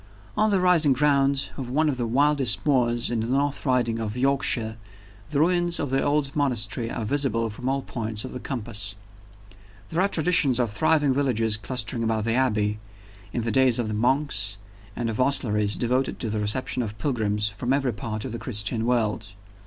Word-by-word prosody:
On 215 0 +2
the 200 -2 +2
rising 170 -6 +4
ground 140 0 +2
of 130 -3 -5
one 155 +5 +1
of 140 -4 0
the 120 -2 -2
wildest 130 -5 +2
moors 120 -4 +1
in 120 - 0
the 110 - -2
North 140 +3 -1
Riding 120 -3 +1
of 110 +1 -4
Yorkshire, 125 -4 +3 0.5
the 145 -2 0
ruins 175 +1 +2
of 145 -4 -2
the 135 - +1
old 145 -1 0
monastery 120 -5 -1
are 115 - -4
visible 120 -4 0
from 125 +5 -4
all 135 0 -1
points 110 -2 -4
of - - -8
the 125 - -5
compass. 105 -7 -3 0.9
There 165 +3 0
are 195 - +3
traditions 160 -8 +2
of 120 -4 0
thriving 150 +2 +2
villages 115 -6 +1
clustering 115 +2 -3
about 110 -1 0
the 115 +1 0
Abbey, 105 -5 0 0.5
in 120 - -2
the 115 - -1
days 130 0 +3
of 120 -3 -2
the - - -3
monks, 125 -2 0 0.4
and 120 - -2
of 110 -1 -3
hostleries 105 -6 +1
devoted 125 +2 -1
to 115 - -2
the 110 - -1
reception 105 +5 -1
of 110 -2 -5
pilgrims 105 -4 0
from 120 +4 -4
every 135 -3 +1
part 110 -2 -5
of - - -5
the 115 - -5
Christian 110 0 0
world. 110 -3 0
125 Hz, 190 wpm, -25 LUFS, 110-140 Hz, 0.9 s, rising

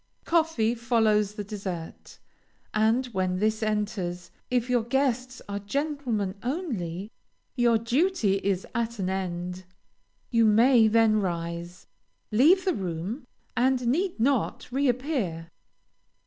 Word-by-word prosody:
Coffee 320 -9 +2
follows 220 -3 +2
the 210 - -4
dessert, 195 -5 -7 0.6
and 220 +4 +2
when 185 -1 0
this 215 +3 0
enters, 200 -5 -2 0.2
if 245 -1 +1
your 250 -2 +2
guests 255 +1 -1
are 200 0 -3
gentlemen 240 -3 -2
only, 220 - -3 0.4
your 240 -2 +4
duty 235 - +1
is 195 -1 -1
at 235 -1 -2
an 190 -2 -1
end. 180 -1 -4 0.7
You 230 -2 +4
may 225 +2 +6
then 220 -1 +4
rise, 170 -1 -4 0.5
leave 320 - +5
the 370 - +2
room, 195 - -4 0.3
and 255 0 +2
need 340 - 0
not 250 0 0
re 275 +2 +1
appear. 240 - -1
220 Hz, 120 wpm, -27 LUFS, 190-255 Hz, 0.7 s, may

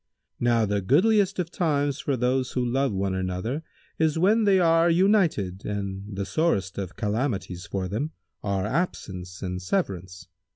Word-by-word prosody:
Now 120 -2 +3
the 100 0 0
goodliest 195 - +3
of 175 -2 -2
times 145 -4 0
for 140 -2 -1
those 125 +1 0
who 125 -1 0
love 135 +2 +1
one 95 -1 -1
another 95 - -2 0.4
is 160 -1 +2
when 210 +6 +4
they 195 -2 +5
are 165 -1 +4
united 170 - +2
and 100 0 -4
the 100 0 -2
sorest 100 - 0
of 95 -3 -5
calamities 105 -5 -2
for 95 -2 -2
them 115 - -2 0.3
are 100 -2 -1
absence 95 - -3
and 90 -1 -3
severance. 90 - -3
115 Hz, 155 wpm, -26 LUFS, 95-160 Hz, 0.4 s, they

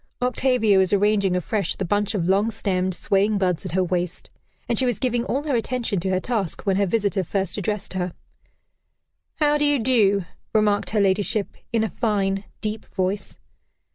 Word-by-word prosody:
Octavia 250 -5 +2
was 190 -1 +3
arranging 200 -2 +2
afresh 195 +3 -1
the 190 - -3
bunch 205 +4 0
of 175 -4 0
long 200 +4 +3
stemmed, 185 -4 -1
swaying 200 +3 +1
buds 185 -2 0
at 170 - -7
her 185 0 +2
waist, 180 -1 -3 0.4
and 235 - +1
she 260 - +2
was 240 -5 0
giving 240 -2 0
all 275 +3 -1
her 290 -4 0
attention 235 -4 -1
to 190 +2 -2
her 185 0 +1
task 205 -5 -2
when 195 -2 +1
her 200 0 +2
visitor 200 -1 0
first 190 +1 -1
addressed 205 -1 -3
her. 180 -2 -2 1.2
"How 295 -1 +2
do - - +1
you 290 -1 +3
do?" 210 -6 +3 0.3
remarked 210 -1 +2
her 215 - +1
ladyship, 200 +1 +1 0.2
in 230 -1 +1
a 220 - -1
fine, 200 -4 -1 0.2
deep 215 0 -4
voice. 190 +1 -2
205 Hz, 180 wpm, -23 LUFS, 190-225 Hz, 1.2 s, was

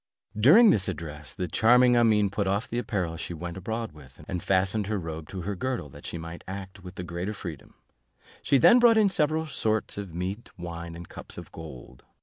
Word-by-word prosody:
During 165 - +7
this 95 -3 +1
address, 75 -4 -6
the 90 -2 -2
charming 125 +7 +5
Amene 110 -4 +4
put 100 0 -1
off 100 +3 0
the 120 - -2
apparel 95 -8 -2
she 85 +1 -5
went 85 +1 -6
abroad 110 +4 -4
with, 70 -4 -16
and 90 - -3
fastened 95 +3 +1
her 105 0 -1
robe 80 -3 -6
to 95 - -5
her 100 +4 -3
girdle 125 - -3
that - - -10
she - - -5
might 85 +1 -8
act 95 0 -8
with 90 0 -10
the 90 - -5
greater 90 +5 -4
freedom; 85 -6 -8 0.7
she 140 - +3
then 235 - +7
brought 235 -2 +6
in 210 -2 +5
several 155 -2 +1
sorts 110 -8 -1
of 100 -3 -6
meat, 95 +6 -4
wine, 85 -1 -7
and 85 0 -9
cups - - -9
of - - -9
gold. 65 -6 -11
95 Hz, 205 wpm, -27 LUFS, 85-110 Hz, 0.7 s, During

